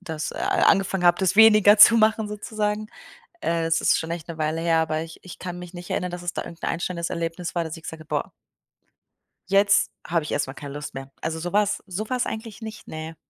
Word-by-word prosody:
das 160 -4 -5
a - - -8 0.3
angefangen 195 -1 +2
habe, 175 - +5
das 190 +1 +1
weniger 215 -2 +7
zu 230 +2 +9
machen, 220 0 +3
sozusagen. 210 0 -3 0.6
Äh, 165 - 0
es 165 0 +2
ist - - +3
schon 160 +1 -5
echt 170 -1 -5
'ne 165 - -6
Weile 155 +1 -1
her, 165 -1 +2
aber 155 -1 0
ich 165 0 -9
ich 185 - -11
kann 180 -1 -6
mich 180 0 -10
nicht 175 0 -9
erinnern, 180 -1 -2
dass 175 0 -7
es 175 - -3
da - - -3
irgend 170 -1 -11
'n - - -1
einstellendes 170 0 -3
Erlebnis 170 +1 -4
war, 170 - +1
dass 160 +1 -6
ich 160 - -14
gesagt 160 -1 -8
habe: 155 - -15
„Boah“ - - -2 1.2
„jetzt 200 +1 +4 0.2
habe 165 -1 0
ich - - -5
erstmal 135 -2 -1
keine 140 -1 -8
Lust 150 0 -7
mehr.” 135 0 -7
Also, 160 0 -2
so 175 +3 -5
war's 210 0 +1
so 200 +4 -5
war's 255 -1 0
eigentlich 220 0 -6
nicht, 220 -1 -9
ne. 160 +1 -7
175 Hz, 235 wpm, -24 LUFS, 160-205 Hz, 1.2 s, zu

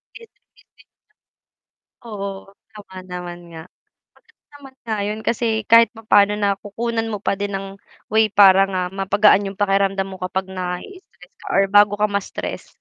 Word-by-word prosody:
Busying-busy. 470 +2 -17 1.6
Oo, 200 -3 -6 0.2
tama 205 -3 -14
naman 175 -1 -7
nga. 160 -1 -10 0.5
Sapat 460 -1 -30 0.2
naman 270 -2 -15
nga 220 -2 -4
'yun 210 +1 -4
kasi 235 +1 -1 0.2
kahit 230 +1 +6
papaano 210 -2 +3
na 200 -2 0
kukunan 225 +3 -4
mo 210 -3 -5
pa 200 - -1
din 205 0 -4
ng 195 0 -4 0.4
way 220 -1 +2
para 195 -1 +6
nga 185 -2 -3
mapagaan 195 +1 +3
'yung 195 +1 -7
pakiramdam 195 -1 0
mo 190 - -9
kapag 185 +1 -4
nai-i-stress 185 - -8
ka - - -17
or 195 - +4
bago 205 0 +5
ka 210 - +2
ma-stress, 200 -1 -5
200 Hz, 150 wpm, -20 LUFS, 195-220 Hz, 1.6 s, kahit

